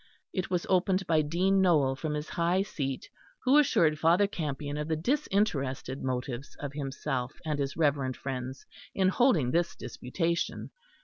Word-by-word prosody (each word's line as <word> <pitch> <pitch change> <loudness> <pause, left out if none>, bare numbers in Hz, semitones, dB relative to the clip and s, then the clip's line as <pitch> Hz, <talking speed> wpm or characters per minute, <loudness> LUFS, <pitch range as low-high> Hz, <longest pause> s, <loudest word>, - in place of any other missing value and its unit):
It 185 - -2
was 180 -2 0
opened 190 +1 +2
by 160 -2 +3
Dean 185 +6 +2
Nowell 150 -8 +3
from 150 +2 -3
his 150 +1 -4
high 175 +3 +1
seat, 135 -9 -4 0.4
who 270 +3 +6
assured 160 - +3
Father 170 +6 +4
Campion 145 -6 -4
of 150 0 -3
the 160 - +1
disinterested 155 - 0
motives 130 0 -4
of 145 -1 -5
himself 135 -2 -3
and 150 -2 -1
his 140 +1 -2
reverend 140 -5 +1
friends 130 0 -5 0.3
in 190 -1 +3
holding 190 - +3
this 170 +1 +1
disputation. 165 +8 -3
155 Hz, 150 wpm, -29 LUFS, 135-185 Hz, 0.4 s, who